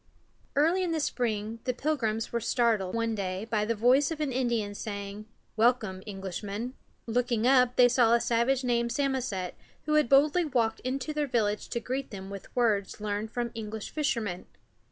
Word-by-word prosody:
Early 325 +6 +3
in 345 -2 -1
the 320 - 0
spring 225 -5 -2
the 255 -2 0
Pilgrims 235 -7 -1
were 235 - +1
startled, 230 -4 +1
one 230 0 0
day, 190 -1 -3
by 215 -2 0
the 230 +1 0
voice 255 +6 +4
of 325 -2 -4
an 300 -3 -1
Indian 240 -5 0
saying: 200 0 -6 0.3
"Welcome, 220 -4 +2
Englishmen." 200 +4 -5 0.3
Looking 235 -1 0
up, 250 -1 +5
they 250 - +7
saw 235 -2 +4
a - - +3
savage 240 +3 +1
named 235 -1 +1
Sam´o 270 0 0
set, 190 -7 -3 0.3
who 305 - -1
had 300 -5 +3
boldly 295 +6 +5
walked 240 -7 0
into 270 +4 -3
their 300 -1 0
village 215 -5 0
to 235 - -2
greet 260 +3 -3
them 195 -1 -8
with 200 -1 -9
words 215 -6 +1
learned 210 +1 -2
from 240 +1 -3
English 220 -1 -6
fishermen. 230 - -2
235 Hz, 175 wpm, -29 LUFS, 210-260 Hz, 0.3 s, they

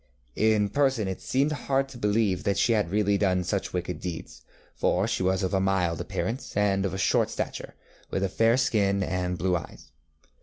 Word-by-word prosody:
In 110 -1 +2
person 130 -3 +1
it 95 - -4
seemed 140 +3 +1
hard 135 -2 0
to 135 - -10
believe 105 -3 +1
that 100 -1 0
she 115 - +3
had 105 -6 +1
really 100 0 +1
done 90 -3 +2
such 95 +3 -2
wicked 90 0 -3
deeds, 90 -3 -7 0.3
for 95 +4 +1
she 115 - -1
was 95 +1 +1
of 95 - -1
a 95 - +3
mild 95 -4 +1
appearance, 120 -2 -4
and 100 -1 +2
of 95 0 -5
short - - +2
stature, - - -5 0.3
with 95 - -1
a - - +2
fair 115 +5 +3
skin 100 -6 +2
and 90 -1 -2
blue 90 0 +1
eyes. 85 - -7
100 Hz, 190 wpm, -27 LUFS, 95-110 Hz, 0.3 s, she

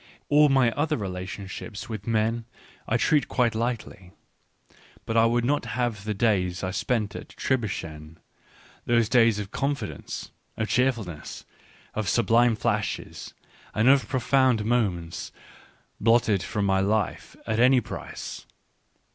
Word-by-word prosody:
All 150 0 +6
my 130 -3 +4
other 150 +4 0
relationships 95 +2 -6
with 110 -3 -6
men 115 +1 0 0.4
I 115 - +2
treat 150 +4 +2
quite 120 -3 +1
lightly; 110 -5 -4 0.9
but 115 - -3
I 115 0 +5
would 120 +1 +1
not 145 +3 +1
have 115 -5 -1
the 105 -1 -2
days 95 -5 +1
I 95 - -1
spent 105 0 -1
at - - -8
Tribschen 80 - -3 0.3
— - - -27
those 115 -2 +3
days 115 -3 +4
of 100 -1 -5
con 140 +1 0
fidence, 110 -7 -7 0.3
of 110 - -2
cheerfulness, 115 - -1 0.5
of 110 -3 -2
sublime 120 0 +3
flashes, 110 -2 -3 0.4
and 110 +3 +3
of 135 -5 +4
profound 130 -3 +2
moments 95 -8 -1 0.4
— - - -35
blotted 115 -3 +3
from 100 +2 -2
my 95 -1 +2
life 100 -1 -1
at 110 0 -1
any 130 +2 +6
price. 120 - -7
115 Hz, 140 wpm, -26 LUFS, 100-120 Hz, 0.9 s, All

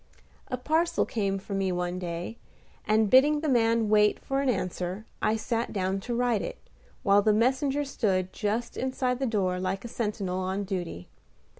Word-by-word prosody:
A 255 - -3
parcel 320 +6 +1
came 195 -3 -1
for 195 +1 -7
me 195 -1 0
one 180 0 -2
day, 175 +5 -5 0.5
and 215 0 +4
bidding 290 +6 +5
the 315 - -1
man 230 -4 +3
wait 210 0 +4
for 270 0 -2
an 275 - +1
answer, 185 -1 -2 0.2
I 215 - +2
sat 230 +1 -2
down 190 -1 -1
to 240 +4 -4
write 240 -4 +1
it, - - -5 0.5
while 200 0 +5
the 215 +1 +3
messenger 270 +5 +2
stood 190 -9 0
just 225 +3 -2
inside 255 -1 -1
the 270 - 0
door 185 -5 0
like 190 +3 -2
a - - -3
sentinel 205 -5 -2
on 190 +2 -2
duty. 180 - -4
215 Hz, 175 wpm, -28 LUFS, 190-245 Hz, 0.5 s, bidding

